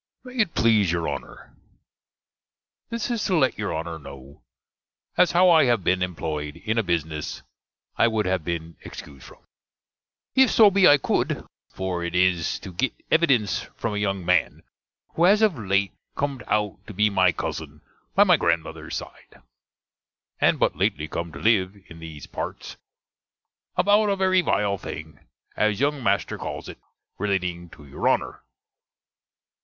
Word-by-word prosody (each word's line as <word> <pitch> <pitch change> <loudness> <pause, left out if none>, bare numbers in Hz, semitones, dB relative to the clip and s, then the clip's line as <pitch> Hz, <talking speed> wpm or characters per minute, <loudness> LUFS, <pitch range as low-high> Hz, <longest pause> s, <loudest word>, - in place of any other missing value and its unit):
MAY 255 0 -11
IT 215 -8 +1
PLEASE 110 -6 +3
YOUR 85 -1 -1
HONNER, - - -7 1.3
This 230 +1 -3
is 230 -3 -1
to 185 -4 +2
let 130 -7 +1
you 105 - -2
Honner 80 0 -4
kno', 70 -1 -12 0.7
as 180 - +4
how 180 +1 +6
I 160 -3 +6
have 120 -6 +2
been 90 0 +2
emploied 75 -4 -3
in 110 +2 +1
a - - +1
bisness 80 -4 -3 0.5
I - - +5
would 110 -2 0
have 90 -2 0
been 85 0 -5
excused 70 -3 -11
from, - - -15 0.9
if 265 -1 +5
so 215 -3 +6
be 195 -1 +5
I 145 - +7
could, - - -1 0.2
for 95 -2 -3
it 85 0 -4
is 90 -2 +2
to 95 - -9
gitt 130 +9 -1 0.2
evidense 130 -11 +2
from 115 - -2
a 105 - -2
young 100 -3 -2
man, 90 -3 +1 0.5
who 170 - +3
has 205 +4 +5
of 210 -6 +3
late 100 -1 +1 0.2
com'd 140 -2 -2
out 105 -2 0
to 105 - -9
be 105 +2 +3
my 95 -2 +4
cuzzen - - -6 0.3
by - - +7
my - - +5
grandmother's 85 -1 -2
side; - - -12 1.0
and - - +3
but - - +1
lately 95 -3 0
come 85 +1 -4
to 70 - -10
live 100 0 +2
in 80 - -12
these 80 -4 -9
partes, - - -6 1.0
about 205 +2 +3
a 200 - +2
very 185 -1 +3
vile 100 - 0
thing, - - -8 0.4
as 105 -1 +1
younge 145 0 0
master 100 -6 0
calls - - -6
it, - - -10 0.4
relating 90 -4 -2
to 75 - -15
your 70 - -3
Honner. - - -1
100 Hz, 160 wpm, -24 LUFS, 85-140 Hz, 1.3 s, I